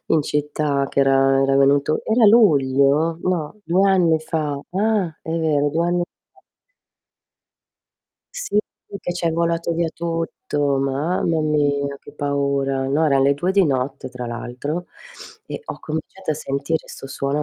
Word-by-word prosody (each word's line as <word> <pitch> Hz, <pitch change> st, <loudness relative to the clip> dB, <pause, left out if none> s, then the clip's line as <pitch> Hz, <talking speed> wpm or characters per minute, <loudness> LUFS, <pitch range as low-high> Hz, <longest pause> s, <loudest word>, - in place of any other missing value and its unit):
in 160 Hz, -, +3 dB
città, 145 Hz, -1 st, -1 dB
che -, -, +1 dB
era 135 Hz, 0 st, +4 dB
era 135 Hz, 0 st, +2 dB
venuto 140 Hz, +2 st, +3 dB
era 220 Hz, 0 st, +4 dB
luglio? 150 Hz, -, +4 dB
No, 180 Hz, +1 st, -2 dB
2 190 Hz, +4 st, +3 dB
anni 175 Hz, -4 st, +3 dB
fa. 155 Hz, -3 st, -2 dB
Ah! 195 Hz, -4 st, 0 dB
È -, -, -7 dB
vero 155 Hz, -3 st, +1 dB
2 165 Hz, +3 st, 0 dB
anni 175 Hz, 0 st, +1 dB, 0.3 s
fa. -, -, -24 dB, 2.0 s
Sì, -, -, -1 dB, 0.4 s
che 175 Hz, -, -3 dB
ci 175 Hz, -1 st, -2 dB
è -, -, +2 dB
volato 170 Hz, +1 st, 0 dB
via 170 Hz, 0 st, 0 dB
tutto, 165 Hz, -3 st, -4 dB, 0.2 s
mamma 155 Hz, +5 st, 0 dB
mia 145 Hz, -2 st, 0 dB
che -, -, -13 dB
paura. 140 Hz, -2 st, -1 dB
No, 150 Hz, +4 st, +2 dB
eran 135 Hz, -2 st, +3 dB
le 140 Hz, +1 st, +4 dB
2 175 Hz, +7 st, -1 dB
di 195 Hz, -1 st, +4 dB
notte 135 Hz, -3 st, -2 dB
tra 125 Hz, -1 st, -7 dB
l'altro 130 Hz, +8 st, -5 dB, 0.6 s
e -, -, -6 dB
ho -, -, -6 dB
cominciato 160 Hz, +3 st, -4 dB
a -, -, -3 dB
sentire 140 Hz, +4 st, -3 dB
sto -, -, -9 dB
suono 140 Hz, +2 st, -2 dB
150 Hz, 150 wpm, -21 LUFS, 140-170 Hz, 2.0 s, era